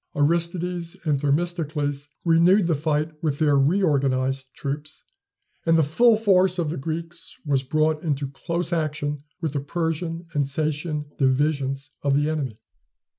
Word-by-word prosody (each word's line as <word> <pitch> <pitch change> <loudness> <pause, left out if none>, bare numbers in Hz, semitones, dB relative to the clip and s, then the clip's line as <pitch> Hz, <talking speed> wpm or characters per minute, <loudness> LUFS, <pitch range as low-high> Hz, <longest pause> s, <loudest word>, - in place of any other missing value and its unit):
Aristides 170 +3 0
and 145 -3 +2
Themistocles 145 -2 -1 0.2
renewed 170 +4 +5
the 165 - +2
fight 155 +1 0
with 150 -4 0
their 145 -2 +3
reorganized 135 -4 +2
troops, 145 +2 -5 0.6
and 165 0 +4
the 160 - +4
full 225 +10 +4
force 190 -4 +3
of 165 -4 -1
the 170 - -4
Greeks 165 +3 -4
was 140 -3 +2
brought 155 +3 +1
into 145 -3 -1
close 170 +6 -3
action 150 -3 -1 0.2
with 160 -4 -2
the 145 - 0
Persian 165 +3 -3
and 145 -3 +1
Sacean 150 +1 -2
divisions 135 0 +1
of 140 -1 +2
the 145 +2 +2
enemy. 135 -8 -3
155 Hz, 140 wpm, -24 LUFS, 140-170 Hz, 0.6 s, renewed